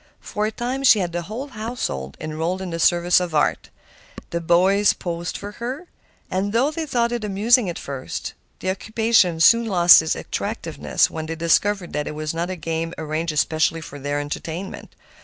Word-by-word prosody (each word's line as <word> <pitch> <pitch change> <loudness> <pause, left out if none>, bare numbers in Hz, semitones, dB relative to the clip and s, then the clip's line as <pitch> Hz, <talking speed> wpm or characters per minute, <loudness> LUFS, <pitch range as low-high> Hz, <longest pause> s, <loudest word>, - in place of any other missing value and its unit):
For 210 +1 -2
a - - -3
time 250 +4 -3
she 250 -5 +7
had 180 -4 -1
the 175 +1 -2
whole 225 - -6
household 215 - -4
enrolled 160 +4 -3
in 190 -2 -5
the 165 - -4
service 175 +1 +4
of 175 -3 -3
art. 150 - +1 0.6
The 170 - -2
boys 190 +5 +4
posed 170 0 -4
for 205 0 -7
her. 260 +8 -4 0.5
They 235 - 0
thought 235 -3 +1
it 240 -2 -3
amusing 210 +2 +3
at 170 - -5
first, 135 -2 -6 0.2
but - - -24
the 185 - 0
occupation 220 -4 +2
soon 230 +7 +6
lost 175 -5 +7
its 160 - -1
attractiveness - - -1
when 160 -1 -5
they 165 - -4
discovered 175 +3 +1
that 150 0 -2
it 150 - -5
was 155 0 -3
not 170 +2 -2
a 185 - -3
game 165 0 -3
arranged 160 +1 -2
especially 160 +2 +1
for 145 -3 -9
their 145 +1 -2
entertainment. 160 +5 -6
175 Hz, 180 wpm, -22 LUFS, 160-215 Hz, 0.6 s, she